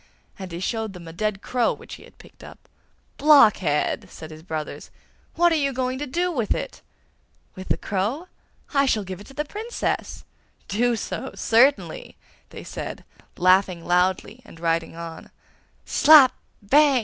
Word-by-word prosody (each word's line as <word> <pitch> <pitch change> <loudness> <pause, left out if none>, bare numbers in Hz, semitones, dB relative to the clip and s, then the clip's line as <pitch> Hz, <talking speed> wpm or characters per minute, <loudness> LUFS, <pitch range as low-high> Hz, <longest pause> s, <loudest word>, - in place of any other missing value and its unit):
and 190 -2 -7
he 170 - -6
showed 220 +2 -3
them 175 -2 -11
a 165 - -9
dead 205 +2 -3
crow 245 -2 +1
which - - -10
he - - -10
had - - -19
picked - - -17
up. - - -14 0.5
'Blockhead!' 210 - +4
said 160 0 -11
his 155 0 -11
brothers, 160 -2 -6 0.5
'what 345 +1 +4
are 320 -2 +1
you 275 0 +1
going 255 0 -2
to 295 - -4
do 350 +7 -1
with 240 -10 -1
it?' - - -6 0.7
'With 185 -1 -10
the - - 0
crow? 215 - -3 0.5
I 275 -1 +3
shall 215 -5 +1
give 190 0 -8
it - - -13
to 270 - -15
the 300 - -2
Princess!' 440 +8 -4 0.4
'Do 235 +4 +1
so, 265 +4 -5
certainly!' 275 - +1 0.3
they - - -10
said, - - -7 0.3
laughing 185 -1 +3
loudly 185 +6 0
and 165 - -15
riding 165 -1 -1
on. 165 -1 -9 0.6
'Slap! 290 -4 +7 0.3
bang! 280 +4 +4
220 Hz, 160 wpm, -23 LUFS, 180-275 Hz, 0.7 s, Slap